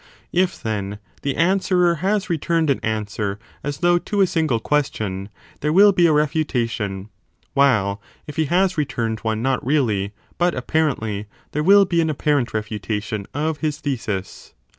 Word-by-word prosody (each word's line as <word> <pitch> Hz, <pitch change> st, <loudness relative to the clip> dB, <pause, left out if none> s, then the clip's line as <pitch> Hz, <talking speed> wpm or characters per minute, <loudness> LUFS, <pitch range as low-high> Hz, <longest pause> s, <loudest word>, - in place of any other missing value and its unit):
If, 180 Hz, +1 st, +1 dB
then, 105 Hz, -2 st, -3 dB, 0.2 s
the 140 Hz, -, -1 dB
answerer 180 Hz, 0 st, +3 dB
has 205 Hz, +2 st, +1 dB
returned 165 Hz, -2 st, +1 dB
an 135 Hz, -, 0 dB
answer 105 Hz, -2 st, -2 dB, 0.3 s
as 145 Hz, 0 st, -3 dB
though 175 Hz, 0 st, +4 dB
to 205 Hz, +3 st, -1 dB
a -, -, +7 dB
single 160 Hz, -9 st, 0 dB
question, 110 Hz, -8 st, -1 dB, 0.3 s
there 150 Hz, -, 0 dB
will 200 Hz, +5 st, +7 dB
be 175 Hz, -3 st, +4 dB
a -, -, +3 dB
refu 150 Hz, +1 st, +2 dB
tation; 110 Hz, -7 st, -3 dB, 0.4 s
while 105 Hz, -8 st, +2 dB, 0.2 s
if 150 Hz, -, -8 dB
he 160 Hz, -, +1 dB
has 180 Hz, +2 st, +2 dB
returned 115 Hz, -6 st, -1 dB
one 110 Hz, 0 st, -2 dB
not 130 Hz, -1 st, 0 dB
really 115 Hz, -8 st, +1 dB, 0.3 s
but 175 Hz, 0 st, +2 dB
appar 155 Hz, +5 st, +1 dB
ently, 105 Hz, -2 st, -4 dB, 0.2 s
there 150 Hz, -, -1 dB
will 200 Hz, +4 st, +6 dB
be 170 Hz, -2 st, +1 dB
an 160 Hz, -, 0 dB
apparent 145 Hz, -4 st, +1 dB
refutation 110 Hz, -1 st, -3 dB
of 155 Hz, +1 st, -1 dB
his 150 Hz, -2 st, -1 dB
thesis. 115 Hz, -10 st, -4 dB
140 Hz, 160 wpm, -21 LUFS, 110-170 Hz, 0.4 s, a